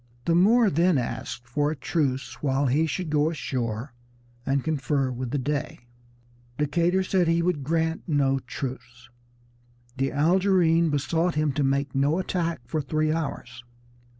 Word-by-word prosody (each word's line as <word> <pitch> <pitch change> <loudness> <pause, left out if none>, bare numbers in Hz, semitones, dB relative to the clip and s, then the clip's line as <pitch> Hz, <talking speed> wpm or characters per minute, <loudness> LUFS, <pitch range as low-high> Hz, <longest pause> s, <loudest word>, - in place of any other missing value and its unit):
The 170 - +2
Moor 210 +5 +5
then 170 +1 +3
asked 120 0 -4
for 145 +4 0
a 155 - -2
truce 135 -1 -2
while 140 -1 +1
he 145 +5 +2
should 165 +1 -3
go 150 +1 +2
ashore 120 -5 -3 0.5
and 135 -1 +1
confer 140 -3 0
with 125 0 -4
the 145 - -1
Dey. 145 +1 -3 0.8
Decatur 170 +6 +1
said 185 -2 +1
he 165 0 +2
would 170 -5 0
grant 160 +2 0
no 135 -3 +2
truce. 125 -2 -7 0.9
The 135 +1 0
Algerine 170 +1 +3
besought 160 +4 0
him 150 -1 +1
to 145 - -1
make 140 0 0
no 140 +4 +2
attack 170 -5 -2
for 155 +5 -2
three 155 +2 0
hours. 135 -6 -4
150 Hz, 150 wpm, -25 LUFS, 135-165 Hz, 0.9 s, Moor